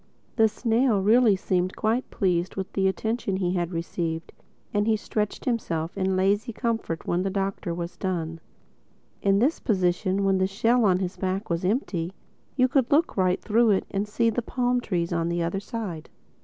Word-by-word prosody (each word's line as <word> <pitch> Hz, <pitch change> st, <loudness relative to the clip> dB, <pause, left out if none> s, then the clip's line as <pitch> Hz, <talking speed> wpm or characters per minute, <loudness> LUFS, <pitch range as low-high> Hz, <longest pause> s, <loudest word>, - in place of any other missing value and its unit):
The 225 Hz, -2 st, +5 dB
snail 230 Hz, 0 st, +1 dB
really 220 Hz, 0 st, +5 dB
seemed 185 Hz, -1 st, 0 dB
to -, -, -15 dB
be -, -, -15 dB
quite 225 Hz, +4 st, 0 dB
pleased 180 Hz, -2 st, 0 dB
with 190 Hz, -1 st, -5 dB
the 190 Hz, -1 st, +2 dB
attention 220 Hz, +1 st, -1 dB
he 180 Hz, -2 st, 0 dB
had 175 Hz, -1 st, -1 dB
received; 165 Hz, -1 st, -3 dB, 0.4 s
and 205 Hz, +1 st, +1 dB
he 220 Hz, -1 st, +3 dB
stretched 210 Hz, 0 st, -3 dB
himself 170 Hz, -9 st, -2 dB
in 190 Hz, -1 st, 0 dB
lazy 200 Hz, +4 st, +1 dB
comfort 225 Hz, -8 st, -2 dB
when 175 Hz, +1 st, 0 dB
the 195 Hz, -, -1 dB
Doctor 195 Hz, -2 st, -2 dB
was 170 Hz, 0 st, -5 dB
done. 165 Hz, -4 st, -3 dB, 0.8 s
In 195 Hz, 0 st, +3 dB
this 265 Hz, +10 st, +2 dB
position, 185 Hz, -1 st, +1 dB
when 195 Hz, -1 st, +2 dB
the 190 Hz, -, +2 dB
shell 225 Hz, +4 st, +2 dB
on 185 Hz, -3 st, +4 dB
his 185 Hz, 0 st, -3 dB
back 190 Hz, +1 st, -2 dB
was 170 Hz, +1 st, -1 dB
empty, 185 Hz, -, -1 dB, 0.4 s
you 255 Hz, -1 st, +4 dB
could 260 Hz, -2 st, +1 dB
look 310 Hz, +3 st, +3 dB
right 185 Hz, -2 st, +2 dB
through 230 Hz, +1 st, +3 dB
it 195 Hz, -2 st, +2 dB
and 200 Hz, +1 st, -1 dB
see 230 Hz, +2 st, +1 dB
the 245 Hz, -, -1 dB
palm 245 Hz, +1 st, 0 dB
trees 175 Hz, -6 st, -1 dB
on 165 Hz, 0 st, 0 dB
the 170 Hz, 0 st, 0 dB
other 170 Hz, +4 st, -1 dB
side. 200 Hz, -7 st, -6 dB
195 Hz, 190 wpm, -26 LUFS, 180-225 Hz, 0.8 s, The